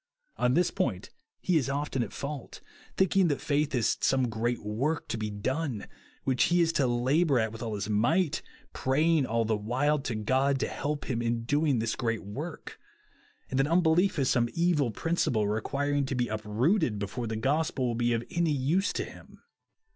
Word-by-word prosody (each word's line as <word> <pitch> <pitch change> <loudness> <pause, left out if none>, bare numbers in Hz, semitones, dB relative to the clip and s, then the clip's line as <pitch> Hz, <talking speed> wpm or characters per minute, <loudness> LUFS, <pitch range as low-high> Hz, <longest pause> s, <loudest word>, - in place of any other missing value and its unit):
On 125 +1 +2
this 175 +1 +3
point 100 -7 -2 0.3
he 180 -3 +2
is 135 -3 0
often 140 -2 -1
at - - -3
fault; 140 -1 -6 0.4
thinking 190 -1 +3
that 145 -3 0
faith 145 0 0
is 120 -3 +1
some 130 -2 +2
great 115 +2 -2
work 130 +10 -1
to - - -1
be 110 -1 -3
done, 125 +3 -2 0.4
which 130 -2 +2
he 175 0 +2
is 165 -1 +3
to 140 -5 +2
labour 135 +5 +2
at 110 -2 +1
Avith 115 0 -9
all 110 -3 -3
his 100 -1 -3
might, 140 - +1 0.3
praying 150 +2 +2
all 115 0 +1
the 110 0 +1
while 130 +8 0
to 125 -4 -3
God 130 +5 +1
to - - +1
help 145 0 -3
him 120 -3 -1
in 115 0 -1
doing 145 +2 +2
this 115 0 -1
great 115 -4 -2
work; 145 - -7 0.7
and 130 - 0
that 135 - +3
unbelief 170 +3 +3
is 135 -3 +1
some 120 -1 +2
evil 165 -6 +2
principle, 115 -5 0
requiring 140 +6 -1
to 135 - -2
be 125 -1 0
uprooted 110 - +1
before 105 +4 -4
the 110 - -3
gospel 140 +3 0
will 120 - 0
be 120 +1 +1
of 115 0 -1
any 170 -1 +1
use 150 +8 +1
to - - -1
him. - - -14
130 Hz, 190 wpm, -29 LUFS, 115-150 Hz, 0.7 s, this